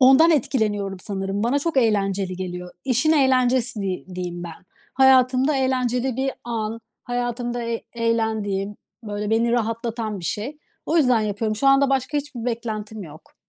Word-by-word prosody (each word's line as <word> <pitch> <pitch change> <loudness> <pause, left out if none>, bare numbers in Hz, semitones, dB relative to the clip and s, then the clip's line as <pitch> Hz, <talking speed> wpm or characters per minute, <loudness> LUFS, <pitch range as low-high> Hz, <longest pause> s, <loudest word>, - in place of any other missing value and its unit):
Ondan 270 +6 +7
etkileniyorum 215 - 0
sanırım. 195 0 -3
Bana 245 +5 +2
çok 320 +1 -2
eğlenceli 195 -5 +1
geliyor. 180 -1 -5
İşin 265 +4 +3
eğlencesi 255 -5 +3
di 190 -2 -3
diyeyim 175 -1 -4
ben. 170 +1 -10 0.3
Hayatımda 265 +1 +4
eğlenceli 255 -1 0
bir 270 +1 0
an, 225 -1 -3 0.2
hayatımda 245 0 -2
e 230 0 -3
eğlendiğim, 220 -4 -1 0.3
böyle 210 0 -3
beni 230 +1 +2
rahatlatan 230 -2 -2
bir - - -9
şey. 225 - -3 0.3
O 325 - +1
yüzden 250 -7 +4
yapıyorum. 215 +1 -1
Şu 275 - 0
anda 275 0 +5
başka 270 +2 0
hiçbir 280 -5 -6
beklentim 220 -3 -4
yok. 155 -2 -13
230 Hz, 145 wpm, -23 LUFS, 205-260 Hz, 0.3 s, Ondan